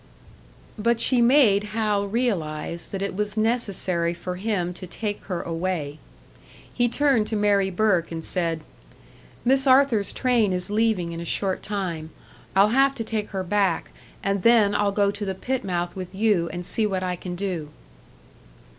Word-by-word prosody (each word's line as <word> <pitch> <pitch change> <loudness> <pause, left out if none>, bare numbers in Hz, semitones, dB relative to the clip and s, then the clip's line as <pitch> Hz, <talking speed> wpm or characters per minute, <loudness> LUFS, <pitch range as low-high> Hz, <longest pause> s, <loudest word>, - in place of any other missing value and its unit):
But 235 +2 +2
she 250 0 +4
made 235 -5 +5
Hal 210 -2 +1
realise 170 -8 -2
that 195 0 -5
it 200 - -3
was 210 +1 -2
necessary 195 -7 0
for 180 +1 -5
him 185 -3 -1
to 180 +1 -9
take 205 +3 -4
her 180 -3 -3
away. 165 -3 -3 0.7
He 240 -1 +2
turned 260 -4 +2
to 220 - -2
Mary 205 -2 +2
Burke 185 -3 +1
and 165 -1 -5
said, 165 -3 -1 0.8
"Miss 270 +2 +3
Arthur's 255 -6 +4
train 235 -6 +1
is 180 +2 -3
leaving 210 -5 +1
in 165 - -6
a - - -5
short 190 +2 -1
time. 180 -6 -4 0.5
I'll 200 +2 +5
have 270 +3 +3
to 230 - -3
take 215 -2 -3
her 190 -2 -3
hack, 195 -3 0 0.3
and 195 -1 0
then 225 -3 +5
I'll 205 -1 +1
go 200 0 +2
to 205 - -6
the 190 -1 -3
pit 260 +6 -2
mouth 175 -2 -2
with 185 0 -7
you 195 -5 +2
and 175 -1 -5
see 220 +3 0
what 190 -2 -2
I 180 -1 -1
can 180 0 -6
do." 175 -5 -3
200 Hz, 170 wpm, -24 LUFS, 180-220 Hz, 0.8 s, made